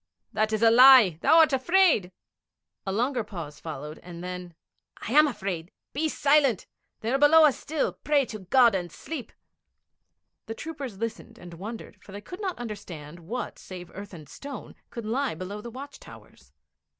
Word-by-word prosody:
'That 215 0 +1
is 220 +1 0
a 225 - +7
lie; 245 -9 +8
thou 325 - +5
art 320 -3 +6
afraid.' 285 - +3 0.8
A - - 0
longer 240 +4 0
pause 160 -8 -8
followed, 150 -1 -7
and 175 -1 -10
then: 180 -2 -7 0.4
'I - - -7
am 300 +3 +6
afraid. 190 - -4 0.2
Be 315 +3 0
silent! 280 -7 +2 0.4
They 230 +3 -2
are 270 - +2
below 310 +2 +7
us 290 - +2
still. 310 -1 -2
Pray 290 -2 +1
to 215 -3 -8
God 235 +4 +4
and 175 -3 -3
sleep.' 275 - -7 1.2
The 225 - -5
troopers 280 -7 -7
listened 230 +1 -6
and 175 -6 -11
wondered, 205 +2 -9
for 195 - -13
they 205 - -7
could 360 - -10
not 380 -3 -3
understand 175 -9 -8
what 220 +10 -6
save 180 -2 -10
earth 200 +1 -9
and 155 -3 -12
stone 280 - -9 0.2
could 235 -2 -7
lie 255 - -1
below 190 +5 -6
the 235 - -8
watch 275 +4 -10
towers. - - -16
225 Hz, 175 wpm, -26 LUFS, 180-275 Hz, 1.2 s, lie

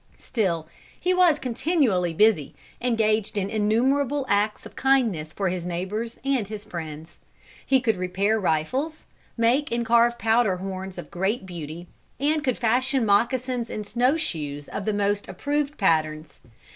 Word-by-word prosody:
Still 180 -9 -1 0.3
he 365 +1 +1
was 360 -4 +5
continually 245 - +1
busy, 180 -4 +2 0.3
engaged 220 -3 +1
in 200 0 -1
innumerable 260 +6 +1
acts 210 0 +1
of - - -11
kindness 230 - +1
for 195 +3 -1
his 180 -1 -3
neighbors 190 +7 -4
and 265 -7 +1
his 210 0 -7
friends. 160 -4 -8 0.4
He 265 - +3
could 225 -5 0
repair 195 +4 0
rifles, 255 - -1 0.3
make 245 +6 +2
and 235 0 0
carve 235 +1 +4
powder 225 -4 +2
horns 190 0 -6
of 175 -4 -8
great 195 +4 -1
beauty, 170 -1 -7 0.3
and 300 +2 +1
could 255 -4 0
fashion 255 +2 +2
moccasins 240 +3 +1
and 210 - -5
snowshoes 200 - -1
of 195 - -5
the 215 - 0
most 205 0 0
approved 285 - -2
patterns. 155 -5 0
215 Hz, 145 wpm, -25 LUFS, 185-255 Hz, 0.4 s, was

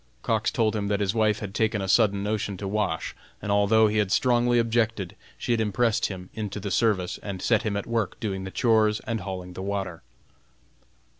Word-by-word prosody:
Cox - - +1
told 110 -1 +1
him 100 -1 -1
that 100 0 0
his 100 -1 0
wife 110 -2 +2
had 100 -3 -5
taken 110 -1 +1
a 95 - -3
sudden 100 -1 +3
notion 105 -2 -2
to 100 - -5
wash, 100 -5 -1 0.2
and 105 - -3
although 105 +2 +4
he 105 0 +1
had 100 -2 0
strongly 120 +1 +3
objected, 115 -5 0 0.2
she - - -3
had 115 -1 +2
impressed 110 +1 +1
him 90 -2 -8
into 105 -2 -4
the 100 0 -4
service, 95 -5 +1
and 100 -3 -5
set 110 +3 +2
him 105 -2 -1
at 100 - -3
work 115 -4 -2
doing 95 -4 -3
the 95 - -5
chores 110 -1 +2
and 115 -3 -3
hauling 90 -2 -6
the 95 - -7
water. 95 -4 -3
105 Hz, 205 wpm, -26 LUFS, 95-110 Hz, 0.2 s, although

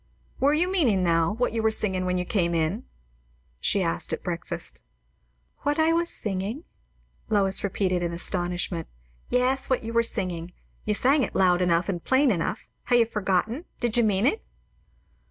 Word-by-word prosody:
"Were 285 +3 +3
you 355 +4 +1
meaning, 245 - +2
now, 165 +1 +2
what 240 +1 -1
you 225 - 0
were 220 - +3
singing 190 -4 -1
when 180 0 0
you 180 - -2
came 170 -3 0
in?" 165 +9 -1 0.7
she 195 - +1
asked 165 - -1
at - - -3
breakfast. 170 -2 -4 0.8
"What 290 +1 0
I 320 +1 +4
was 340 +1 +1
singing?" 205 - -3 0.7
Lois 195 -3 +2
repeated 185 -2 0
in 170 -1 -1
astonishment. 175 0 -2 0.4
"Yes, 255 +1 +1
what 260 -2 +1
you 230 +1 -5
were 230 - +4
singing. 180 -6 -4 0.3
You 210 - +1
sang 270 +6 +3
it - - -2
loud 180 -1 +4
enough 170 -1 +2
and 175 -4 -3
plain 260 0 +3
enough; 185 +2 -2 0.2
ha' - - -1
you 240 -1 +6
forgotten? 215 - -1
Did 240 -3 0
you 240 - +4
mean 205 -1 +2
it?" 430 - +1
205 Hz, 170 wpm, -26 LUFS, 180-245 Hz, 0.8 s, you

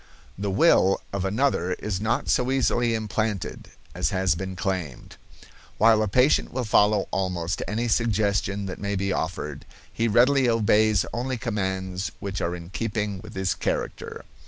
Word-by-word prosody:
The 100 +1 -3
will 95 0 +4
of 100 -1 -1
another 95 -4 +1
is 100 -1 -4
not 110 +2 0
so 125 0 +2
easily 120 -3 +1
implanted 110 -2 -3 0.2
as - - 0
has 95 -1 +1
been 95 +2 -5
claimed. 90 -9 -4 0.6
While 110 0 +5
a 110 - +1
patient 125 +8 +3
will 130 0 -2
follow 105 -2 +3
almost 90 -2 -2
any 115 +3 -1
suggestion 105 -3 0
that 95 - -6
may 100 0 -2
be 100 0 -1
offered, 75 -5 -4 0.3
he 115 - 0
readily 125 +4 +4
obeys 110 -2 +3
only 125 +2 -2
commands 95 -5 -3
which 100 0 -4
are 85 +1 -1
in 85 0 -10
keeping 105 -2 -2
with 110 -1 -11
his 95 -1 0
character. - - -4
100 Hz, 155 wpm, -25 LUFS, 95-115 Hz, 0.6 s, While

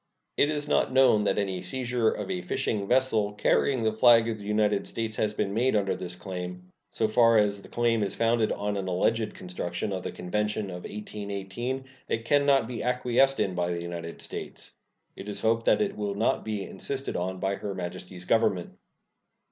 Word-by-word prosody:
It 145 - +3
is 150 -1 -1
not 145 - +2
known 125 -5 +5
that - - +1
any 95 -3 -1
seizure 125 -3 0
of - - -4
a 180 -1 -2
fishing 110 - -2
vessel 115 -5 +3
carrying 125 +4 +2
the 110 -1 +2
flag 115 0 +6
of 110 -1 -3
the 100 - -9
United 105 -1 +1
States 110 -1 -2
has 105 0 0
been 100 -2 -1
made 120 +3 +2
under 100 -2 +1
this 90 -1 -5
claim. 90 -1 -7 0.2
So 110 - 0
far 115 +1 +5
as 100 -1 +2
the - - -13
claim 115 -2 +1
is 100 - -1
founded 115 -1 +2
on 105 0 -2
an 95 -1 -3
alleged 110 +5 0
construction 90 +2 -4
of 95 - -4
he - - -2
convention 105 +2 -2
of 90 0 -7
1818, 105 +5 -5 0.2
it 115 0 -2
can 145 +2 +3
not 135 -5 +4
be 120 -2 -5
acquiesced 125 +2 +2
in 95 - +1
by 90 0 -1
the 85 0 -3
United 85 -1 -6
States. - - -5 0.4
It 105 - -8
is 105 - -1
hoped 115 +1 +1
that - - +4
it 200 - -3
will 100 -1 -3
not 110 +3 +1
be 105 -2 -3
insisted 135 +9 -4
on 95 +1 -2
by 95 +1 0
Her 100 -2 -5
Majesty's 90 0 -6
Government. 95 -5 +2
105 Hz, 195 wpm, -27 LUFS, 95-120 Hz, 0.4 s, flag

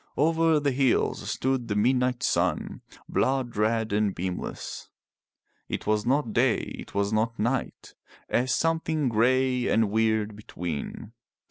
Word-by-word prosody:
Over 160 +1 +3
the 145 -1 +1
hills 130 -1 +1
stood 130 -2 -1
the 105 - -1
midnight 125 +3 +1
sun, - - 0 0.3
blood 130 -2 0
red 110 0 +1
and 105 -2 +1
beamless. 90 0 -5 0.8
It - - -4
was 105 +1 0
not 130 -4 +1
day, 120 0 +3 0.2
it - - -10
was 100 +1 0
not 115 +2 0
night 120 +4 -2 0.2
— - - -24
a 125 - +1
something 160 0 +1
grey 125 +2 +2
and 110 -2 +2
weird 110 -1 +1
between. 90 -7 -6
120 Hz, 135 wpm, -27 LUFS, 105-130 Hz, 0.8 s, Over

